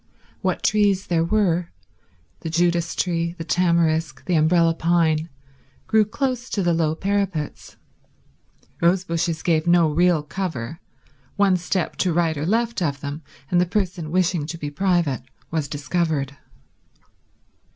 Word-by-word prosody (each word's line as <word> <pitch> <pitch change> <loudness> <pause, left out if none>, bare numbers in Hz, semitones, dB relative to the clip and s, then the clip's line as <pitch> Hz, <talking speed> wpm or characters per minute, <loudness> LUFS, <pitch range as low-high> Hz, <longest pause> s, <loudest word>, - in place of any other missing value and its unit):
What - - -1
trees 205 -3 +2
there 165 -2 +1
were—the 170 - -3
Judas 170 0 +1
tree, 170 -1 -1
the 165 - -5
tamarisk, 165 -4 +1
the 180 - -1
umbrella 165 +1 +4
pine—grew 160 - 0
close 245 +2 -2
to 200 - -1
the 175 -1 +2
low 160 -1 +1
parapets. 195 -5 -2 1.0
Rose 175 +2 +3
bushes 165 -2 -2
gave 160 -1 +1
no 170 -2 +4
real 175 -1 +3
cover; 160 -4 -4 0.6
one 200 -2 +4
step 180 +1 -2
to 185 - +1
right 165 -1 +1
or 150 +2 -3
left 230 +1 0
of 140 -5 -1
them, 145 +2 -5 0.3
and 175 0 +4
the 180 - +1
person 185 -4 -2
wishing 175 -3 +1
to 165 - -5
be 145 -2 -5
private 170 -5 +1 0.3
was 160 -3 -1
discovered. 145 -1 -1
170 Hz, 130 wpm, -23 LUFS, 155-185 Hz, 1.0 s, umbrella